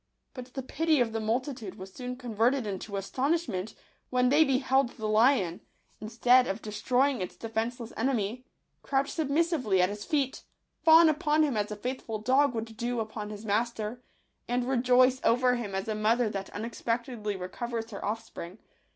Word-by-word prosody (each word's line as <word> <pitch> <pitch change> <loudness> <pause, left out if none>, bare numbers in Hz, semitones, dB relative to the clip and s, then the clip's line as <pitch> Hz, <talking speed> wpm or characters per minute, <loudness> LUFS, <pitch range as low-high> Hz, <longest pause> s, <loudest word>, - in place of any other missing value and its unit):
But 250 -1 -10
the 265 - -3
pity 315 +3 +1
of 240 -2 +2
the 225 - -2
multitude 230 -1 -2
was 190 0 -10
soon 250 -1 -5
converted 245 +1 0
into 200 0 -4
astonishment 240 - -1 0.3
when 250 0 +2
they 295 +4 +6
beheld 265 -2 +2
the 220 - -7
lion, 215 -4 +3 0.4
instead 245 +3 +3
of 195 +3 -2
destroying 245 +4 0
its 180 - -5
de 230 - -7
fenceless 230 +1 -3
enemy, 235 -1 -1 0.4
crouch 275 0 0
submissively 300 - +1
at 180 +1 +4
his 205 0 -6
feet, 280 -4 -1 0.4
fawn 325 +1 +8
upon 310 0 +2
him 285 -5 0
as 210 0 -1
a 210 - -4
faithful 240 0 -4
dog 260 +4 +2
would 225 0 -5
do 240 +1 -2
upon 215 -1 -5
his 210 +1 -8
master, 220 +2 -1 0.5
and 245 +1 0
rejoice 255 0 +4
over 250 +1 +3
him 210 -5 -4
as 195 +2 -3
a 220 - -1
mother 220 +2 +2
that 195 -1 -5
unexpectedly 230 0 -3
recovers 225 +5 -5
her 200 - -7
off 220 +3 -2
spring. 175 +4 -9
235 Hz, 170 wpm, -29 LUFS, 215-260 Hz, 0.5 s, fawn